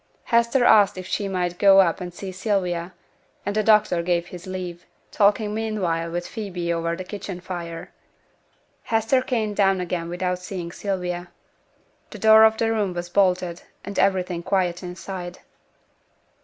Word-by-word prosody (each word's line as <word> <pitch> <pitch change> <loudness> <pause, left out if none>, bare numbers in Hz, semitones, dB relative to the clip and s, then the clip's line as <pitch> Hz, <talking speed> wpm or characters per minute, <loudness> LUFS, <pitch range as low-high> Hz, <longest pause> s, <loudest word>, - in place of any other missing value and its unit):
Hester 235 +2 +2
asked 205 -4 +5
if 185 - -6
she 200 +2 -2
might 180 -2 -2
go 195 -1 +7
up 180 -1 +3
and 180 -1 -5
see 190 +2 -7
Sylvia, 185 -3 -1 0.5
and 205 - -2
the 215 - +3
doctor 210 -5 +3
gave 170 0 0
his 180 +1 -10
leave, 180 -2 -6 0.2
talking 210 +1 +2
meanwhile 195 -7 -1
with 175 +1 -3
Phoebe 180 -6 -3
over 170 0 -1
the 185 - -6
kitchen 195 -1 -7
fire. 170 -2 -7 0.9
Hester 225 +3 +2
came 225 -5 -1
down 195 -2 +2
again 175 -1 -3
without 180 +1 -2
seeing 180 -2 -6
Sylvia. 180 -2 -4 0.8
The - - -9
door 220 0 +7
of 220 0 +3
the 225 0 +1
room 205 -5 -1
was 175 0 -4
bolted, 180 -2 +1 0.2
and 200 -1 -4
everything 185 -3 +1
quiet 180 -2 0
inside. 180 0 -7
185 Hz, 155 wpm, -23 LUFS, 175-205 Hz, 0.9 s, go